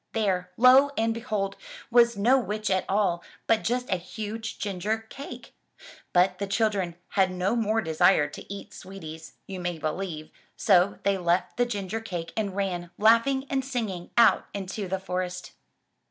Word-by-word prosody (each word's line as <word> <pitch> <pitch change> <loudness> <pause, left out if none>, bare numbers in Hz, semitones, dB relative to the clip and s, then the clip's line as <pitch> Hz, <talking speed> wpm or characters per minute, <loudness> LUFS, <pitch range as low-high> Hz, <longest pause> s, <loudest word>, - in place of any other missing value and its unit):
There, 190 -5 0
lo 255 +4 +7
and 225 0 +2
behold! 215 -4 -2 0.4
was 235 -2 +5
no 245 +7 +4
witch 215 -3 -2
at 190 -1 +1
all 190 -4 +1 0.2
but 225 -1 +2
just 245 +2 -1
a 185 - +2
huge 215 +5 -6
ginger 205 +2 -2
cake! 275 - -9 0.6
But 180 +1 +3
the 200 - -2
chil 215 +2 +2
dren 185 -5 -3
had 190 -1 +2
no 185 +4 0
more 225 -1 +1
desire 160 -2 +3
to 145 +6 -10
eat 200 0 -8
sweeties, 160 -5 -9
you 190 -1 -6
may 175 -1 -3
believe, 155 0 -4 0.3
so 190 -1 +4
they 200 -1 +1
left 175 +1 0
the 245 0 +2
ginger 205 -1 -3
cake 175 -6 -5
and 205 -4 -2
ran, 180 -3 -2
laughing 230 +5 +4
and 270 -1 -1
singing, 220 -10 -4
out 230 -1 +5
into 195 +1 -4
the 190 +1 -2
forest. 180 -1 -4
195 Hz, 165 wpm, -27 LUFS, 180-225 Hz, 0.6 s, lo